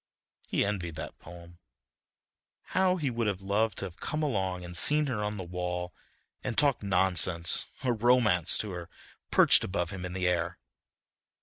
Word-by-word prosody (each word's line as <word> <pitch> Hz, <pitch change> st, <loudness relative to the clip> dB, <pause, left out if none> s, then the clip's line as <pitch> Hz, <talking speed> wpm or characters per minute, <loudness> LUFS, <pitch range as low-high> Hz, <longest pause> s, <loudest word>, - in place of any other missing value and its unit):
He -, -, +1 dB
envied 90 Hz, -6 st, -3 dB
that 80 Hz, -, -8 dB
poem. 85 Hz, 0 st, -13 dB, 1.1 s
How 185 Hz, -1 st, +3 dB
he 150 Hz, -7 st, -2 dB
would 115 Hz, -2 st, -1 dB
have 100 Hz, -2 st, -2 dB
loved 105 Hz, +1 st, 0 dB
to -, -, -4 dB
have 90 Hz, -2 st, -9 dB
come 155 Hz, +1 st, -3 dB
along 95 Hz, -9 st, -1 dB
and 90 Hz, 0 st, -8 dB
seen 150 Hz, -, +5 dB
her 115 Hz, -7 st, -2 dB
on 105 Hz, 0 st, -3 dB
the 95 Hz, -, -5 dB
wall 90 Hz, 0 st, -4 dB, 0.5 s
and 125 Hz, -3 st, -3 dB
talked 140 Hz, -4 st, +3 dB
nonsense 90 Hz, -3 st, +2 dB, 0.2 s
or 125 Hz, -2 st, +2 dB
romance 110 Hz, -7 st, +3 dB
to 105 Hz, -, -3 dB
her, 85 Hz, -2 st, -7 dB, 0.4 s
perched -, -, +5 dB
above 90 Hz, -2 st, -2 dB
him 95 Hz, -2 st, -6 dB
in 90 Hz, 0 st, -5 dB
the 90 Hz, -1 st, -1 dB
air. 85 Hz, -1 st, -1 dB
95 Hz, 170 wpm, -29 LUFS, 90-115 Hz, 1.1 s, seen